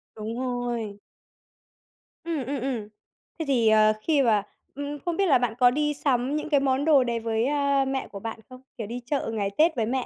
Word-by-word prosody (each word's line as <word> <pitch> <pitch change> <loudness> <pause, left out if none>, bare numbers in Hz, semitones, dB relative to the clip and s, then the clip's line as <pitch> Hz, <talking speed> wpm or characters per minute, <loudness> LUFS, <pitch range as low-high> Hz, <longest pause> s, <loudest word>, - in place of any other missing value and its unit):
Đúng 220 +2 -5
rồi. 240 -5 -3 1.2
Ừm, 320 -6 -3
ừm, 275 0 -3
ừm. 245 -5 -3 0.5
Thế 320 - -2
thì, 245 -5 +2
ờ, 215 0 +5
khi 300 +3 +2
mà 220 -6 +3 0.3
ừm, 285 +1 -4
ừm, 290 +1 -5
không 345 -2 -1
biết 395 - +3
là 285 - +5
bạn 245 -2 -1
có 245 -1 +6
đi 295 +2 0
sắm 275 -1 0
những 305 - -3
cái 290 -2 +4
món 270 +1 +1
đồ 295 -5 +5
đấy 235 -1 -1
với, 225 0 0
a, 280 -1 +2
mẹ 265 0 -2
của 200 - -9
bạn 225 +2 -6
không? 255 0 -12 0.2
Kiểu 220 - -5
đi 240 +3 -5
chợ 270 -3 -2
ngày 205 -3 -1
Tết 320 +1 +4
với 230 -3 0
mẹ 255 +2 -1
255 Hz, 220 wpm, -26 LUFS, 230-285 Hz, 1.2 s, có